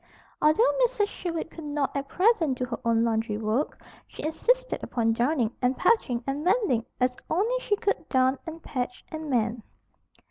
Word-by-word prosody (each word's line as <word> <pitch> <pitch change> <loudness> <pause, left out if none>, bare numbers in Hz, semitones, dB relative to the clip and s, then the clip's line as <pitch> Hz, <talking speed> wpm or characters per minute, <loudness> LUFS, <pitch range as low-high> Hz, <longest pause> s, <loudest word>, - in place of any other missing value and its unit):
Although 310 +11 +5
Mrs. 455 -4 +1
Sherwood 330 -2 -4
could 325 - -9
not 290 -2 -2
at 275 0 -2
present 360 - +2
do 250 - -1
her 235 -2 -5
own 230 -1 +3
laundry 225 -2 0
work, 220 +7 -1 0.3
she - - -10
insisted - - 0
upon 225 -2 +1
darning 240 -1 +1
and 250 +1 +1
patching 255 - +2
and 275 +2 -2
mending 350 - +2
as 250 0 +2
only 450 +9 +1
she 420 - 0
could 410 0 -2
darn 260 0 +3
and 325 0 -7
patch 250 -2 -4
and 315 -1 -6
mend. 235 -2 0
275 Hz, 170 wpm, -27 LUFS, 240-350 Hz, 0.3 s, Although